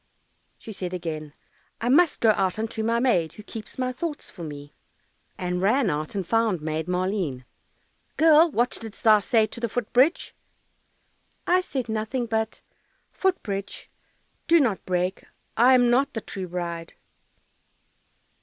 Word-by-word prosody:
She 225 - -10
again 170 -4 -3
said, 145 - -17 0.5
"I 235 - -1
must 300 +4 +4
go 225 - +6
out 190 -2 0
unto 220 0 -3
my 230 +1 +1
maid, 180 - +1
Who 210 - -12
keeps 220 0 -8
my 255 -1 -1
thoughts 310 +2 -5
for 180 - -12
me," 145 -2 -8 0.6
And 180 0 -2
ran 220 +1 +2
out 150 +5 -4
and 195 -2 -2
found 225 -3 +1
Maid 155 +1 -3
Maleen, 180 -8 -2 0.7
"Girl, 320 +1 +6
what 245 -3 +1
didst 225 -2 -10
thou 215 -2 +7
say 220 +2 +2
to 215 - -9
the 235 -1 -2
foot 240 0 -4
bridge?" 265 +8 +3 1.1
"I 365 +1 +3
said 265 -9 -4
nothing 220 +3 -2
but, 220 -1 -2 0.5
"Foot 380 -1 0
bridge, 200 -1 -6 0.6
do 335 0 +6
not 230 -10 +1
break, 180 +1 -1 0.3
I 250 +3 +6
am 245 -1 +4
not 265 +3 +2
the 225 - -2
true 190 -3 -6
bride." 170 -1 -5
220 Hz, 155 wpm, -25 LUFS, 180-245 Hz, 1.1 s, thou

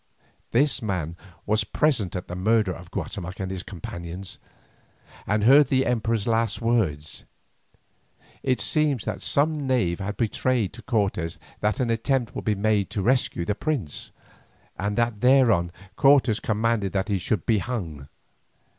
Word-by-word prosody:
This 140 +5 +2
man 90 -7 -2 0.3
was 110 +1 +2
present 110 - 0
at 90 - -4
the 90 - -6
murder 105 +1 +2
of 90 0 -9
Guatemoc 90 0 -5
and 95 -1 -3
his 95 -1 -4
companions, 85 0 -7 0.9
and 105 +1 +1
heard 135 +4 +7
the 130 0 +2
Emperor's 115 -3 0
last 115 -1 +1
words. 100 -11 0 1.2
It 130 -3 +1
seems 145 +2 +1
that 105 -2 -3
some 150 -1 +1
knave 100 -10 +1
had 100 +1 -4
betrayed 115 -2 0
to 115 - -10
Cortes 100 -7 -1 0.2
that 105 0 0
an 125 -3 +1
attempt 120 +2 0
would - - -6
be 105 - +2
made 105 0 +1
to 100 - -3
rescue 120 -8 +1
the 105 - 0
prince, 115 - -3 0.7
and 100 +1 -2
that 115 -3 0
thereon 120 -9 +4 0.3
Cortes 135 -6 +5
commanded 110 -2 0
that 95 0 0
he 100 -3 0
should 90 0 -1
be 110 -3 +3
hung. 85 - -5
110 Hz, 150 wpm, -25 LUFS, 95-120 Hz, 1.2 s, heard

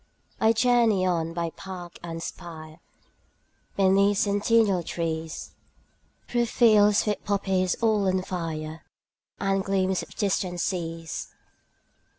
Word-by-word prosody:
20 220 - +4
I - - +5
journey 230 -5 +3
on 165 -3 0
by 170 -1 -3
park 180 -2 -9
and 165 -1 -6
spire, 160 -2 -9 1.0
Beneath 200 +1 +4
centennial 205 -1 +2
trees, 160 -1 -4 0.8
Through 240 -1 +1
fields 210 -3 +4
with 210 -1 -2
poppies 190 -2 0
all 215 -3 +3
on 185 0 +1
fire, 160 -3 -5 0.6
And 195 -1 0
gleams 190 -1 0
of - - -11
distant 185 -4 -1
seas. 165 -2 -3
190 Hz, 115 wpm, -26 LUFS, 170-205 Hz, 1.0 s, I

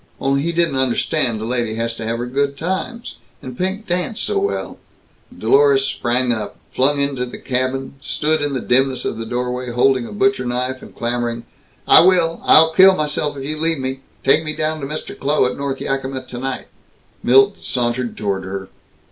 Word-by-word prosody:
Only 135 0 +1
he 170 +3 -1
didn't 170 -5 +1
understand 130 -1 0
a - - -3
lady 120 -2 -1
has 115 +1 -2
to 115 - -7
have 115 +1 -2
her 120 - -3
good 140 +2 -1
times, 190 - -4 0.2
and 130 -1 -8
Pink 190 - -2
danced 180 +3 -2
so 415 - 0
well 400 +1 -3 0.3
" - - -36
Dlorus 415 -1 +4
sprang 125 - 0
up, 110 -2 -5
flung 140 +3 +2
into 140 -3 -1
the 125 - -6
cabin, 130 +1 -2
stood 155 +1 0
in 145 -1 -1
the 130 - -2
dimness 130 +1 +1
of - - -3
the 115 - -5
doorway, 125 +1 -3
holding 125 0 +2
a - - -10
butcher 200 -7 +1
knife 125 +1 -2
and - - -13
clamoring, 120 0 -2 0.4
"I - - +9
will! 170 -2 +3
I'll 160 +1 +6
kill 190 +2 +7
myself 150 -2 -2
if 135 - -6
you 155 +2 -4
leave 165 0 +1
me! 130 0 -4 0.2
Take 150 +4 +4
me 155 -1 -4
down 155 0 -2
to 135 - -4
Mr. 155 +2 -6
Kloh, 145 0 +1
at 125 - -1
North 140 -1 -3
Yakima, 135 -1 -3
tonight!" 125 +1 -5 0.6
Milt 135 +2 +4
sauntered 120 -1 -2
toward 100 -2 -2
her. 95 0 -6
135 Hz, 190 wpm, -19 LUFS, 125-155 Hz, 0.6 s, I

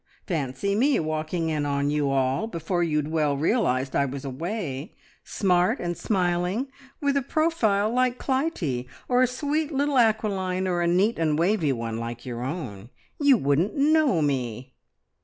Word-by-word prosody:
Fancy 155 +2 -2
me 265 +7 +3
walking 155 +1 -2
in 150 -2 -1
on 140 0 0
you 145 -1 +1
all, 135 +9 +1
before 175 -2 -2
you'd 150 -3 0
well 150 -3 +1
realised 140 - +1
I 140 - +3
was 140 +1 -6
away, 150 - -4 0.3
smart 180 -3 +1
and 175 0 -2
smiling 180 +6 0 0.3
with 280 -1 +1
a 280 - +2
profile 235 -9 +1
like 250 0 +2
Clytie, 250 - -1 0.2
or 250 0 +3
a 255 - +5
sweet 295 +5 -2
little 280 -1 +1
acquiline, 195 -5 +1
or 175 -1 0
a 170 - +1
neat 190 +6 +2
and 155 -2 +1
wavey 170 -3 +2
one, 115 -2 -3
like 115 0 -6
your 120 -2 -5
own. 125 - -5 0.3
You 285 -3 +5
wouldn't 150 +5 +1
know 290 - +3
me!" 130 -3 -2
175 Hz, 160 wpm, -25 LUFS, 140-230 Hz, 0.3 s, a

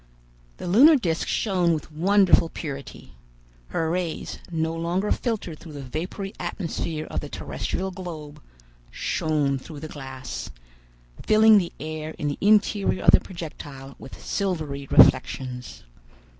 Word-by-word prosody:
The - - -7
lunar 255 - +7
disc 170 - -1
shone 180 -6 +1
with 155 +1 -7
wonderful 185 +1 +4
purity. 140 - -7 0.5
Her 160 - -1
rays, 175 -2 -3
no 160 -1 -1
longer 175 +5 -1
filtered 210 - -2
through 160 - -11
the 140 -1 -7
vapory 180 - -5
atmosphere 160 -3 -3
of - - -1
the 145 - -7
terrestrial 190 +6 -4
globe, 155 -5 -8 0.5
shone 145 -4 0
through 145 +1 -10
the 155 - -5
glass, 135 -4 -7 0.7
filling 215 0 +6
the 175 -3 -3
air 155 0 -5
in 145 - -1
the 145 - -4
interior 205 -1 +3
of - - +7
the - - +7
projectile 145 -6 -9
with 135 - -11
silvery 155 -8 -3
reflections. 130 -1 +3
160 Hz, 130 wpm, -25 LUFS, 145-190 Hz, 0.7 s, lunar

